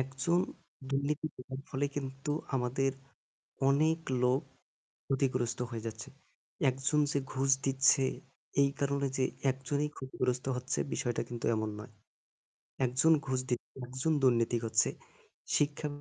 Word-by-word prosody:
একজন 135 +7 +1 0.5
দুর্নীতি 140 +3 0
করার 130 +1 -7
ফলে 140 +1 0
কিন্তু 135 +1 -3 0.2
আমাদের 130 +1 +1 0.8
অনেক 155 +4 +4 0.2
লোক 125 +3 +4 0.7
ক্ষতিগ্রস্ত 130 -3 0
হয়ে 115 -1 -5
যাচ্ছে। 110 -1 -6 0.6
একজন 135 +3 +1
যে 140 - +2
ঘুষ 135 +1 0 0.2
দিচ্ছে 135 +1 +4 0.6
এই 140 - +4
কারণে 140 0 +1
যে 130 - +2 0.3
একজনই 140 +3 -1
ক্ষতিগ্রস্ত 125 -1 -1
হচ্ছে 125 +1 -2
বিষয়টা 120 -2 0
কিন্তু 120 -1 -4
এমন 110 0 -1
নয়। 110 +3 -9 0.9
একজন 130 +6 +3 0.2
ঘুষ 130 -1 +1
দিচ্ছে 125 -1 -3
একজন 130 +6 -1
দুর্নীতি 120 -2 +4
করছে। 110 -1 +2 0.7
শিক্ষা 145 +1 +1
135 Hz, 120 wpm, -32 LUFS, 125-140 Hz, 0.9 s, অনেক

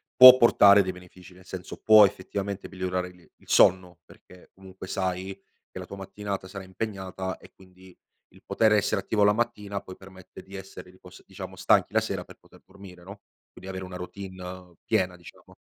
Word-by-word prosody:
può 130 0 +11
portare 100 -4 +6
dei 95 - -3
benefici, 90 0 -15
nel 95 +1 -18
senso 90 0 -8
può 110 -1 +7
effettivamente 100 +1 -5
migliorare 90 -1 -3
il 90 0 -16 0.2
il - - -24
sonno 90 -2 +3
perché 90 -1 -19
comunque 95 0 -12
sai 95 0 -3 0.4
che - - -9
la - - -8
tua 100 - -9
mattinata 100 0 -6
sarà 95 0 -9
impegnata 95 -2 -6
e 95 - -17
quindi 95 -1 -19 0.4
il - - -20
poter 110 -1 +2
essere 105 - +1
attivo 105 -2 0
la 105 0 +5
mattina 105 -4 -3
poi 95 - -11
permette 95 -1 -14
di 95 - -17
essere 95 -1 -11
ripos 95 - -17
diciamo - - -10
stanchi - - +2
la - - +4
sera - - -4
per - - -15
poter - - -22
dormire, 95 -3 -15
no, 100 +2 -12 0.3
quindi 95 - -12
avere 95 0 -6
una 90 0 -10
routine, 95 +1 -9
uhm, 90 -1 -10
piena 90 -1 0
diciamo. 85 - -17
95 Hz, 190 wpm, -26 LUFS, 90-100 Hz, 0.4 s, può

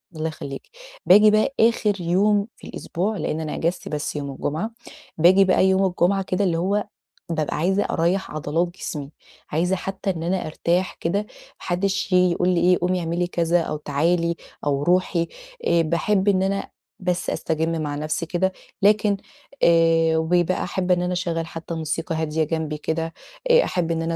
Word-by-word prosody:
الله 155 +1 -2
يخلّيكِ. 140 -3 -6 0.4
باجي 210 +3 +7
بقى 215 +5 +2
آخِر 215 -4 +2
يوم 200 +4 +2
في - - -13
الأسبوع، 200 +5 -3
لإن 155 -1 -2
أنا 155 -1 -4
أجازتي 170 +3 -2
بس 150 0 -3
يوم 140 -1 -4
الجمعة. 155 - -3 0.5
باجي 185 +4 +6
بقى 185 0 +3
يوم 190 +1 +3
الجمعة 190 +1 +1
كده، 185 +2 -1
اللي 170 -3 +1
هو 200 +4 0 0.5
بابقى 155 -3 -1
عايزة 190 +5 +1
أريّح 175 +4 0
عضلات 155 +3 -1
جسمي، 150 -5 -6 0.4
عايزة 175 +5 +1
حتى 195 +1 -4
إن 165 -3 -2
أنا 180 +1 -1
أرتاح 175 +4 0
كده، 170 +5 0
ما - - -10 0.3
حدّش 190 +2 -1
ييجي 180 -1 +4
يقول 180 +1 +1
لي 175 -2 +2
إيه، 180 0 +4
قومي 180 0 +1
اعملي 170 +1 -1
كذا، 170 0 +1
أو 155 - -3
تعالي، 170 +4 0 0.3
أو 140 0 0
رُوحي. 175 0 +2 0.4
آآ 170 -1 +4
باحب 190 +5 +1
إن 190 -2 +3
أنا 195 +1 -1 0.3
بس 180 -1 -1
أستجِم 160 0 -1
مع 145 -1 -3
نَفْسي 155 +3 -2
كده. 180 +3 0 0.3
لكن 205 0 +3 0.5
آآ 165 -1 +4
وبيبقى 175 +2 +1
أحب 180 +1 -2
إن 175 -1 +3
أنا 180 0 -1
أشغّل 170 -2 -2
حتى 165 +1 -7
موسيقى 160 +1 -3
هادية 160 0 0
جنبي 155 -1 -2
كده، 160 +2 -3 0.4
آآ 485 +1 +6
أحب 170 -2 -1
إن 165 0 -1
أنا 165 0 -1
175 Hz, 175 wpm, -23 LUFS, 160-190 Hz, 0.5 s, باجي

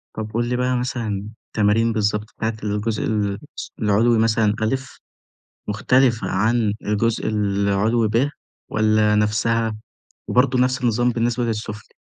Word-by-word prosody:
طب 110 -1 -5
قل 120 +1 0
لي 125 - 0
بقى 125 0 0
مثلًا 110 -5 -3 0.2
التمارين 115 +2 +2
بالضبط 105 -1 0
بتاعة 110 0 -2
الجزء 105 +1 -1
الس 105 +5 -3
العلوي 110 +2 +3
مثلًا 110 -1 +2
أ، 110 +4 +2 0.9
مختلفة 115 +3 +2
عن 110 +2 +1
الجزء 110 +2 0
العلوي 105 +2 +1
ب 115 +6 +2 0.4
والّا 110 0 +2
نَفسها؟ 110 +1 +1 0.5
وبرضه 125 0 +3
نفس 130 0 +1
النظام 120 +1 +2
بالنسبة 120 +1 0
للسفلي. 110 -2 -5
110 Hz, 125 wpm, -21 LUFS, 105-120 Hz, 0.9 s, العلوي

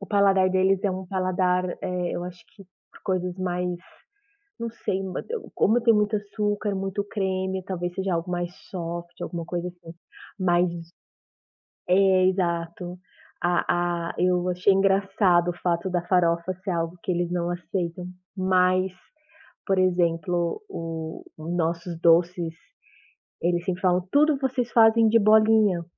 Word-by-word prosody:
o 200 - -8
paladar 195 -2 +4
deles 190 +1 +2
é 200 - +1
um 185 0 -5
paladar, 185 -1 0
eh, 180 -1 -2
eu 175 - -3
acho 180 -1 -9
que 195 - -14 0.3
pra - - -18
coisas 180 -1 -1
mais 180 -1 -1 0.9
não 230 0 -4
sei, 195 -4 -3 0.5
como 230 +3 +3
tem 230 -1 +5
muito 210 0 +2
açúcar, 205 0 -2
muito 195 +1 -2
creme, 190 -2 -2
talvez 175 -2 -3
seja 190 -1 -1
algo 165 +1 -3
mais 175 0 -3 0.2
soft, 170 -1 -6
alguma 170 -1 -4
coisa 175 +1 -3
assim, 175 -2 -12 0.5
mais 175 -1 +3 1.2
é 185 0 +4
exato, 175 -1 -2 0.4
a 175 -1 0
a - - -7
eu 180 0 +2
achei 180 +2 +3
engraçado 195 -2 +3
o 175 - -12
fato 175 +1 0
da 175 -1 -1
farofa 170 0 +2
ser 190 +2 -5
algo 165 0 -2
que - - -1
eles 175 0 -1
não 175 -1 -1
aceitam, 175 0 -4 0.3
mas, 185 0 +2 0.7
por 195 -2 +1
exemplo, 175 - +1
o 160 -1 -6
nossos 170 +1 -2
doces, 170 0 +3 0.9
eles 175 0 +1
sempre 180 -1 -2
falam: 180 -1 +2
"Tudo 300 0 +4
vocês 260 -3 -1
fazem 225 0 +6
de 230 +1 +5
bolinha, 215 -4 +4
180 Hz, 140 wpm, -25 LUFS, 175-195 Hz, 1.2 s, fazem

